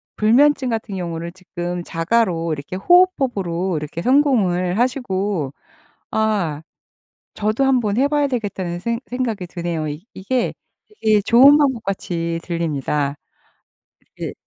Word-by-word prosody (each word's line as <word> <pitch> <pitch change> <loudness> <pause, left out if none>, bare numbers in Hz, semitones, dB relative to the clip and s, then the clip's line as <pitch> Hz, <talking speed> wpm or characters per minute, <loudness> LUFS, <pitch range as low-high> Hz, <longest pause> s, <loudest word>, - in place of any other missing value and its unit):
불면증 260 +4 +3
같은 220 -3 -3
경우를 170 -1 -5
지금 175 -1 -5
자가로 170 -2 0
이렇게 150 +5 -6
호흡법으로 200 - +2
이렇게 150 +2 -5
성공을 210 -8 +2
하시고 200 - -1 0.6
아 195 -9 0 0.7
저도 215 +5 0
한번 245 -6 +2
해봐야 285 +2 +2
되겠다는 195 -8 -3
생 230 +4 -2
생각이 230 -7 -3
드네요. 170 -3 -3
이 150 +4 -6
이게 245 +6 -1 0.5
되게 215 -2 +4
좋은 270 +8 +7
방법같이 195 - -1
들립니다. 150 -4 -2 1.0
이게 - - -5
195 Hz, 275 characters per minute, -20 LUFS, 170-245 Hz, 1.0 s, 좋은